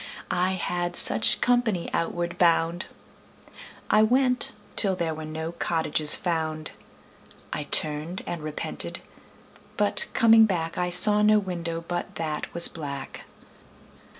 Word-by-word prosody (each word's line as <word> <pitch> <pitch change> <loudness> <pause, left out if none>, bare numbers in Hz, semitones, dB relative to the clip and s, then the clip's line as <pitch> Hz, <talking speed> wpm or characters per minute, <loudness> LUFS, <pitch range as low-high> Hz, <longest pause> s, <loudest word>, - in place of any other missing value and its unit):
I 185 +1 0
had 175 -1 -3
such - - +3
company 240 -8 0
outward 170 +1 -3
bound. 170 0 +1 1.0
I 215 - +4
went 250 +3 +1 0.2
till 195 -3 +5
there 170 -3 -3
were 155 0 -8
no 160 +1 -6
cottages 160 -3 +1
found. 155 -3 -4 0.8
I 150 - -4
turned 155 +5 +2
and 170 -2 -6
repented, 155 0 -3 0.8
but 205 0 +1
coming 225 -1 +5
back 165 -4 -3
I 180 0 -2
saw 210 +4 +5
no 215 0 +4
window 170 -4 -5
but 175 0 -5
that 155 -2 -5
was 170 0 +5
black. 140 -4 -8
175 Hz, 125 wpm, -24 LUFS, 160-195 Hz, 1.0 s, till